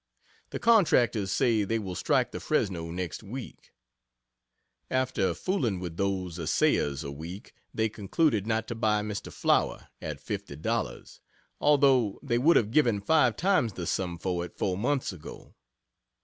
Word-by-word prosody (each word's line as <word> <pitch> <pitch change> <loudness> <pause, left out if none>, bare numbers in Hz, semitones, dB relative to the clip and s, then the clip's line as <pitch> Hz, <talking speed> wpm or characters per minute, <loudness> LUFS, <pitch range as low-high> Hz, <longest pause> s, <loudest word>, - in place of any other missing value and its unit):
The - - -4
Contractors 125 - +3
say 110 0 +2
they 115 +3 0
will 95 -4 -4
strike - - +1
the - - -5
Fresno 85 -4 -1
next 90 0 -4
week. 120 +4 -9 1.2
After 130 -9 0
fooling 120 - -1
with 85 -2 -6
those 95 -3 -2
assayers 75 -2 +1
a 70 - -5
week, 85 +7 -9 0.2
they 110 0 0
concluded 110 - 0
not 110 0 0
to - - -2
buy 110 -2 +1
"Mr. 105 -1 -5
Flower" - - 0
at - - -4
$50, 70 -4 -4 0.4
although 135 -7 +3
they 120 - +1
would 160 +7 +5
have 110 -2 +1
given 120 -7 +3
five 125 +1 +3
times 175 - +2
the 90 - -5
sum 90 0 -2
for 90 -1 -2
it 90 - -10
four 95 - 0
months 130 +3 -1
ago. 80 -5 -11
105 Hz, 150 wpm, -28 LUFS, 90-125 Hz, 1.2 s, would